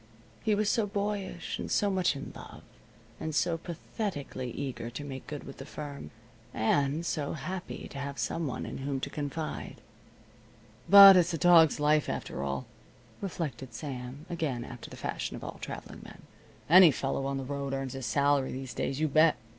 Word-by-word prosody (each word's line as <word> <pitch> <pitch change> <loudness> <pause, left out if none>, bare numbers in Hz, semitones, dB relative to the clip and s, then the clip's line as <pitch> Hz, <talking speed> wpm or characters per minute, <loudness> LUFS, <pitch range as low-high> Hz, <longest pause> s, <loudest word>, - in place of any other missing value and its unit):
He 215 -2 +2
was 210 0 0
so 215 0 +2
boyish, 200 -3 -3
and - - -4
so 205 -1 +2
much 185 -5 +1
in 140 - -7
love, - - -11 0.6
and 155 -1 -4
so 170 +3 +2
pathetically 165 - -5
eager 125 -2 -5
to 125 +5 -7
make 135 -2 -7
good 145 -2 -6
with 135 - -10
the - - -6
firm, 145 -2 -7 0.5
and 140 +8 +1
so 150 -4 -2
happy 185 +5 -6
to 140 - -7
have 140 0 -5
some 165 -2 -1
one 130 - -4
in - - -6
whom 135 0 -2
to 140 - -5
confide. 150 +2 -5 1.1
"But 195 -1 +11
it's 175 -1 +3
a - - -2
dog's 165 -2 +6
life, 150 0 +3
after - - -4
all," 70 -1 -3 0.6
reflected 135 - -5
Sam, 130 +1 -6
again 155 -8 -2
after 120 -1 -9
the - - -10
fashion - - -4
of - - -9
all - - -7
traveling - - -7
men. - - -13 0.4
"Any 180 +2 +9
fellow 135 -1 -1
on 140 0 -2
the 135 - -3
road 140 0 -3
earns 135 -1 -3
his 135 -2 -4
salary 140 -1 +2
these 130 -1 -6
days, 135 - -2
you 155 - +2
bet. 155 +2 +5
145 Hz, 180 wpm, -30 LUFS, 135-170 Hz, 1.1 s, But